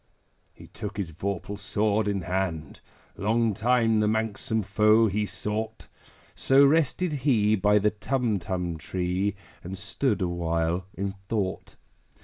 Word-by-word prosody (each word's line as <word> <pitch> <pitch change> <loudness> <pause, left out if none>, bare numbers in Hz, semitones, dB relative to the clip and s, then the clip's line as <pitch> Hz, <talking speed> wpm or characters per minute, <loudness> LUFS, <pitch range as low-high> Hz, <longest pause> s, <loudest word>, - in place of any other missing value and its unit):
He - - -13
took 105 -1 -7
his 95 -5 -3
vorpal 100 +4 -4
sword 105 +1 0
in 100 -2 0
hand: 90 -4 -3 0.4
Long 110 +2 +1
time 115 0 +2
the 105 - +2
manxome 110 0 -1
foe 105 +2 +4
he 105 0 0
sought 105 +2 -4 0.5
So 135 +1 +5
rested 160 +3 +2
he 120 -7 +2
by 105 +1 +3
the 105 +1 +2
Tumtum 100 -8 -2
tree, 90 +4 -1 0.3
And 95 +2 -6
stood 100 +5 -1
awhile 85 0 -1
in 100 0 -2 0.2
thought. 100 -5 -2
105 Hz, 130 wpm, -26 LUFS, 95-110 Hz, 0.5 s, So